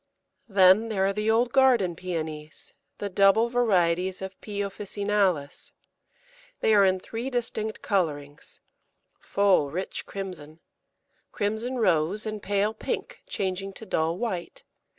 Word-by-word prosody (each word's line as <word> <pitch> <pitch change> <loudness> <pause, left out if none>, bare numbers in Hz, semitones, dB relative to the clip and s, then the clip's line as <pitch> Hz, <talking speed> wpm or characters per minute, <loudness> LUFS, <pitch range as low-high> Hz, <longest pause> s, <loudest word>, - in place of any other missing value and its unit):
Then 195 +3 +5
there 195 -3 +1
are 195 - +1
the 210 +2 -1
old 235 +2 +2
garden 245 -10 +4
Pæonies, 160 -3 -6 0.3
the 205 - -3
double 200 +4 +4
varieties 185 -6 +1
of 190 0 -8
P. 205 -2 -6
officinalis. 200 -6 -1 0.9
They 220 - +3
are 205 -1 +6
in 190 -1 +3
three 230 +7 -5
distinct 230 -3 -3
colourings 145 -7 -2 0.6
full 195 -8 +2
rich 180 +6 -5
crimson, 170 -6 -7 0.7
crimson 220 +5 -2
rose, 185 -1 +1
and 215 -1 -4
pale 205 +2 0
pink - - -5
changing 195 0 -3
to 220 - -10
dull 165 -3 0
white. 230 - -4
195 Hz, 125 wpm, -26 LUFS, 180-220 Hz, 0.9 s, are